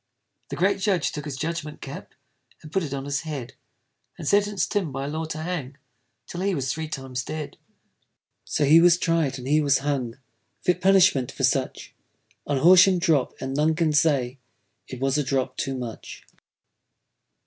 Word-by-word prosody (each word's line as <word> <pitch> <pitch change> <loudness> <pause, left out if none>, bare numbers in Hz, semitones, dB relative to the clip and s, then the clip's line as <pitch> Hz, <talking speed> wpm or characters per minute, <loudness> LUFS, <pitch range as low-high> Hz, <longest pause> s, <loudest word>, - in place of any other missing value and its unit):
The - - -4
great 195 +2 +1
judge 190 -5 +1
took 150 -2 -6
his 140 -3 -5
judgment 160 -1 -4
cap, 135 - -9 0.5
And 155 - -11
put 190 - +1
it 155 -5 -5
on 140 -1 -4
his 140 0 -1
head, 140 -5 -6 0.6
And - - -7
sentenc'd 205 0 +1
Tim 195 -8 -1
by 135 +1 -4
law 155 +3 -3
to 155 0 -6
hang, 155 -5 -4 0.5
'Till 175 - -6
he 195 -1 0
was 135 -3 -1
three 160 0 -4
times 135 -4 -5
dead. 155 +1 -6 0.9
So 150 - 0
he 160 +4 +7
was 175 0 +6
tried, 165 -6 0
and 125 0 -8
he 150 +2 +3
was 140 -2 +3
hung 130 -5 -2 0.5
(Fit 180 0 +1
punishment 180 -9 +4
for 135 - -6
such) 135 0 0 0.5
On 145 - 0
Horsham 180 +5 +6
drop, 160 -6 +1
and 135 0 -4
none 155 +3 +2
can 160 -2 +1
say 140 -4 +1 0.5
It 130 - -8
was 135 +2 +1
a - - +1
drop 130 -1 -1
too 135 0 -3
much. 120 -3 -8
150 Hz, 175 wpm, -24 LUFS, 135-170 Hz, 0.9 s, he